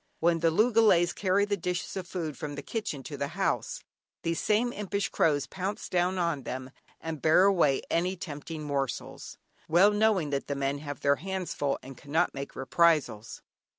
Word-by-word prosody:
When 165 0 +3
the 165 0 +3
loogalays 210 -2 +4
carry 200 +1 +2
the 205 0 0
dishes 180 -1 -3
of 185 -2 -4
food 165 -5 -4
from 145 -1 -5
the 145 - -6
kitchen 180 - -4
to 145 0 -7
the 140 - -2
house, - - -1 0.4
these 165 0 -1
same 230 +3 +1
impish 200 -1 -2
crows 145 -3 +2
pounce 195 +2 -4
down 180 +1 +1
on 170 -5 0
them 130 +1 -6 0.3
and 160 -2 -5
bear 160 +3 +5
away 170 -9 +3
any 180 +3 +1
tempting 155 -1 -6
morsels, 140 -4 -4 0.3
well 180 +6 +6
knowing 205 -7 +2
that 140 -1 -2
the 140 - -2
men 140 +1 -1
have 145 -1 -7
their 140 0 +3
hands 190 0 -4
full, 140 -1 -1
and 130 -1 -10
cannot 155 +5 0
make 140 0 -6
reprisals. 135 -6 +1
170 Hz, 180 wpm, -29 LUFS, 145-190 Hz, 0.4 s, well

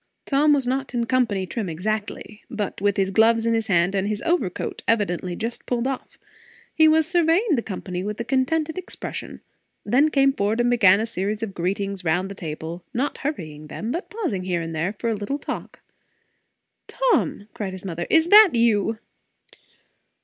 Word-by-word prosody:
Tom 295 +2 +3
was 280 -3 +3
not 265 0 -2
in 235 -1 +1
company 230 -6 +1
trim 190 +3 -4
exactly, 210 +4 -4
but 210 -6 -4
with 200 -1 +1
his 195 -1 +1
gloves 225 +2 +4
in 230 - +2
his 225 0 0
hand 175 -1 +2
and 195 0 0
his 210 0 -2
overcoat 330 - -1
evidently 185 -5 0
just 230 +3 -5
pulled 245 -1 -1
off. 265 -1 -4 0.6
He 315 -1 +5
was 315 0 +4
surveying 350 +4 +2
the 245 - +2
company 185 -4 -5
with 210 +2 -4
a - - -1
contented 305 +7 0
expression; 370 - -7 0.4
then 280 +5 +3
came 275 -2 +3
forward 210 0 0
and 240 0 +2
began 200 -5 +5
a 220 - 0
series 210 0 -3
of 205 -3 -4
greetings 195 +2 -2
round 180 +3 0
the - - -6
table; 165 0 -6
not 270 +5 -1
hurrying 155 - -5
them, 220 +9 -5
but 340 +7 -4
pausing 350 - -3
here 180 -2 0
and 165 0 -5
there 165 +5 -1
for 220 +3 -5
a - - 0
little 210 +7 -3
talk. - - -7 1.1
"Tom!" - - 0
cried 195 -3 -4
his 190 0 -9
mother, 175 -2 -4
"is 325 +1 +4
that 420 - +8
you?" 225 -2 +2
220 Hz, 180 wpm, -23 LUFS, 190-270 Hz, 1.1 s, that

